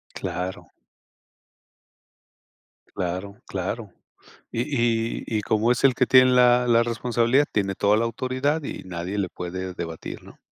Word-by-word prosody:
Claro. 90 Hz, +2 st, -5 dB, 2.3 s
Claro, 95 Hz, +3 st, -3 dB
claro. 95 Hz, +2 st, -4 dB, 0.6 s
Y 115 Hz, -, -1 dB
y 115 Hz, -5 st, 0 dB
y 110 Hz, -2 st, 0 dB
como 110 Hz, +3 st, +1 dB
es 125 Hz, -, +1 dB
el 130 Hz, -2 st, +6 dB
que 125 Hz, -, +2 dB
tiene 130 Hz, -1 st, +7 dB
la 125 Hz, 0 st, +5 dB
la 115 Hz, -1 st, +4 dB
responsabilidad, 120 Hz, +3 st, +1 dB
tiene 100 Hz, -2 st, 0 dB
toda 105 Hz, +1 st, +3 dB
la 115 Hz, -, +1 dB
autoridad 130 Hz, +6 st, -1 dB
y -, -, -6 dB
nadie 90 Hz, +2 st, -5 dB
le 95 Hz, -2 st, 0 dB
puede 90 Hz, +1 st, -6 dB
debatir, 80 Hz, -2 st, -7 dB
¿no? -, -, -15 dB
115 Hz, 135 wpm, -24 LUFS, 95-125 Hz, 2.3 s, tiene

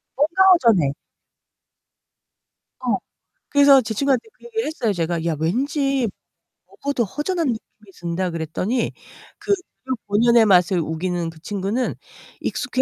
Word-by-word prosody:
뭔가 320 Hz, +7 st, +3 dB
허전해. 215 Hz, -, +3 dB, 1.9 s
어. -, -, 0 dB, 0.5 s
그래서 280 Hz, -2 st, +6 dB
제 225 Hz, -2 st, -4 dB
친구한테 275 Hz, -, +1 dB
그 -, -, -20 dB
얘기를 455 Hz, -1 st, -2 dB
했어요, 250 Hz, -9 st, -1 dB
제가. 170 Hz, -1 st, -2 dB
"야, 165 Hz, -2 st, 0 dB
왠지 270 Hz, -, 0 dB, 0.6 s
먹어도 280 Hz, -4 st, -2 dB
허전한 300 Hz, -, -2 dB
느낌이 220 Hz, -3 st, -6 dB
든다." 175 Hz, +2 st, -2 dB
그랬더니 170 Hz, +9 st, -2 dB, 0.5 s
그 405 Hz, -, 0 dB
재료 265 Hz, -8 st, -7 dB
본연의 230 Hz, +3 st, +4 dB
맛을 180 Hz, -2 st, +4 dB
우기는 170 Hz, +2 st, -2 dB
그 165 Hz, -1 st, -13 dB
친구는 205 Hz, +7 st, -2 dB, 0.5 s
익숙해 255 Hz, -, -1 dB
225 Hz, 275 characters per minute, -22 LUFS, 175-275 Hz, 1.9 s, 그래서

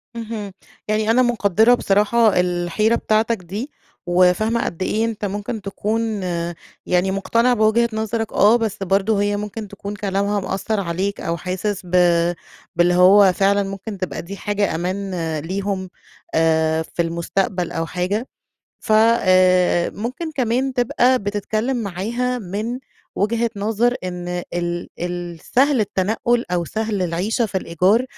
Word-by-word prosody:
اهم. 220 Hz, -3 st, -5 dB, 0.4 s
يعني 215 Hz, +1 st, +1 dB
أنا 250 Hz, +3 st, +4 dB
مقدرة 225 Hz, -2 st, +3 dB
بصراحة 210 Hz, -1 st, +3 dB
الحيرة 180 Hz, +5 st, +1 dB
بتاعتك 220 Hz, +1 st, +1 dB
دي، 200 Hz, -, -6 dB, 0.3 s
وَفاهمة 185 Hz, +6 st, +2 dB
قد 170 Hz, -, -5 dB
إيه 220 Hz, +4 st, 0 dB
أنتَ 220 Hz, -2 st, -3 dB
ممكن 205 Hz, +2 st, -4 dB
تكون 215 Hz, +1 st, -2 dB
آآ، 170 Hz, -1 st, -3 dB, 0.3 s
يعني 180 Hz, +1 st, +1 dB
مقتنع 230 Hz, +5 st, +2 dB
بوجهة 230 Hz, +1 st, +3 dB
نظرك 220 Hz, 0 st, -2 dB
آه، 210 Hz, +4 st, +5 dB
بس 225 Hz, -4 st, -1 dB
برضو 195 Hz, +3 st, +1 dB
هيّ 205 Hz, 0 st, +1 dB
ممكن 210 Hz, +1 st, -5 dB
تكون 205 Hz, +1 st, -7 dB
كلامها 200 Hz, +1 st, -1 dB
مأثر 195 Hz, +3 st, -2 dB
عليك 190 Hz, +2 st, -2 dB
أو 170 Hz, 0 st, -2 dB
حاسس 190 Hz, +2 st, -3 dB
بَ -, -, -11 dB, 0.9 s
باللي 175 Hz, +1 st, +3 dB
هو 185 Hz, +2 st, +6 dB
فعلًا 200 Hz, +2 st, +2 dB
ممكن 195 Hz, +2 st, -6 dB
تبقى 185 Hz, -1 st, -4 dB
دي 195 Hz, +4 st, -8 dB
حاجة 205 Hz, -4 st, -1 dB
أمان 185 Hz, +3 st, -3 dB
آآ 160 Hz, -3 st, -2 dB
ليهم، 190 Hz, +2 st, -3 dB, 0.5 s
آآ 160 Hz, 0 st, +2 dB
في 160 Hz, -, -3 dB
المستقبل 170 Hz, +2 st, -1 dB
أو 165 Hz, -, -2 dB
حاجة 190 Hz, +8 st, -2 dB, 0.5 s
فَ 220 Hz, -, -2 dB
آآ، 185 Hz, -6 st, +4 dB
ممكن 255 Hz, +10 st, -5 dB
كمان 260 Hz, 0 st, 0 dB
تبقى 245 Hz, +1 st, +2 dB
بتتكلّم 215 Hz, +4 st, -2 dB
معاها 230 Hz, +6 st, -2 dB
من 215 Hz, +4 st, -4 dB, 0.4 s
وجهة 230 Hz, +3 st, 0 dB
نظر 225 Hz, +4 st, +1 dB
إن 180 Hz, -1 st, -4 dB
ال 175 Hz, 0 st, -2 dB
ال 175 Hz, -1 st, -4 dB
سهل 270 Hz, 0 st, +4 dB
التنقل 220 Hz, +4 st, 0 dB
أو 175 Hz, -1 st, 0 dB
سهل 215 Hz, +1 st, -2 dB
العيشة 185 Hz, +7 st, 0 dB
في 190 Hz, -2 st, -2 dB
الإيجار، 185 Hz, +8 st, +2 dB
200 Hz, 140 wpm, -20 LUFS, 180-225 Hz, 0.9 s, هو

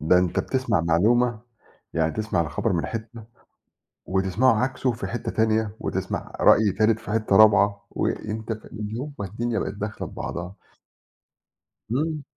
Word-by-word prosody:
ده 80 Hz, +4 st, +4 dB
أنتَ 90 Hz, -1 st, 0 dB
بتسمع 130 Hz, -9 st, 0 dB
معلومة 110 Hz, +8 st, +2 dB, 0.5 s
يعني 80 Hz, -1 st, +1 dB
تسمع 110 Hz, -5 st, -1 dB
الخبر 85 Hz, +7 st, -1 dB
من 85 Hz, -4 st, 0 dB
حتَّة 115 Hz, 0 st, -6 dB, 0.8 s
وتسمعه 100 Hz, +6 st, +2 dB
عكسه 130 Hz, -1 st, 0 dB
في 120 Hz, -, -5 dB
حتَّة 120 Hz, -, -4 dB
تانية، 110 Hz, -1 st, +1 dB
وتسمَع -, -, -3 dB
رأي 105 Hz, -2 st, +6 dB
تالت 110 Hz, +2 st, +2 dB
في 105 Hz, -, -7 dB
حتَّة 110 Hz, -2 st, +1 dB
رابعة، 100 Hz, -1 st, +5 dB
وأنتَ 110 Hz, +1 st, -3 dB
ف 110 Hz, -, -11 dB
اليوم 115 Hz, +7 st, -6 dB
ما 100 Hz, -, -2 dB
الدنيا 115 Hz, +3 st, -2 dB
بقت -, -, -3 dB
داخلة 105 Hz, +1 st, -5 dB
في -, -, -12 dB
بعضها. 85 Hz, +3 st, -5 dB, 1.4 s
إمم. 150 Hz, +3 st, -1 dB
110 Hz, 145 wpm, -24 LUFS, 95-115 Hz, 1.4 s, رأي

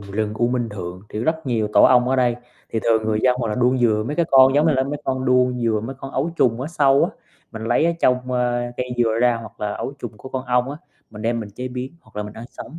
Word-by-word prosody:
rừng 105 Hz, +2 st, -3 dB
U 120 Hz, +2 st, +1 dB
Minh 125 Hz, -2 st, -1 dB
Thượng, 90 Hz, -3 st, -7 dB
thì -, -, -6 dB
rất 160 Hz, +6 st, -1 dB
nhiều 115 Hz, -4 st, 0 dB
tổ -, -, +6 dB
ong 125 Hz, -1 st, +5 dB
ở 130 Hz, -, +1 dB
đây, 125 Hz, -2 st, +2 dB, 0.3 s
thì 115 Hz, -, -1 dB
thường 110 Hz, -1 st, +2 dB
người 110 Hz, 0 st, 0 dB
dân 125 Hz, -1 st, +3 dB
hoặc 115 Hz, -3 st, -1 dB
là 105 Hz, -, -1 dB
đuông 125 Hz, +2 st, +2 dB
dừa 110 Hz, -3 st, +2 dB
mấy 150 Hz, -, -3 dB
cái 170 Hz, -2 st, +2 dB
con 135 Hz, 0 st, +7 dB
giống 150 Hz, +3 st, +4 dB
như 160 Hz, -, +4 dB
là 130 Hz, -1 st, +2 dB
mấy 145 Hz, +2 st, -3 dB
con 130 Hz, -1 st, -1 dB
đuông 125 Hz, -1 st, +2 dB
dừa, 110 Hz, -2 st, +1 dB
mấy 135 Hz, +3 st, -5 dB
con 135 Hz, -, -7 dB
ấu 145 Hz, +6 st, -1 dB
trùng 120 Hz, -4 st, +2 dB
ở 135 Hz, -, -3 dB
sâu 140 Hz, -4 st, +3 dB
á, -, -, -2 dB, 0.4 s
mình 110 Hz, 0 st, -6 dB
lấy 120 Hz, +6 st, +2 dB
ở 170 Hz, -, +2 dB
trong, 125 Hz, 0 st, +1 dB
ơ, 120 Hz, -1 st, 0 dB
cây 125 Hz, 0 st, -3 dB
dừa 115 Hz, -1 st, +2 dB
ra, 120 Hz, -1 st, +3 dB
hoặc 115 Hz, 0 st, -11 dB
là 105 Hz, -1 st, -2 dB
ấu 135 Hz, -, -4 dB
trùng 120 Hz, -4 st, -6 dB
của 130 Hz, -, -10 dB
con 130 Hz, 0 st, -4 dB
ong 125 Hz, +2 st, +1 dB
á, 145 Hz, -, -6 dB, 0.3 s
mình 105 Hz, 0 st, -9 dB
đem 115 Hz, +1 st, 0 dB
mình 105 Hz, -, -6 dB
chế 125 Hz, +5 st, -6 dB
biến, 125 Hz, +2 st, -6 dB
hoặc -, -, -21 dB
là 105 Hz, -, -2 dB
mình 105 Hz, 0 st, -8 dB
ăn 115 Hz, -, -9 dB
sống. 165 Hz, -, -10 dB
125 Hz, 290 wpm, -21 LUFS, 110-130 Hz, 0.4 s, con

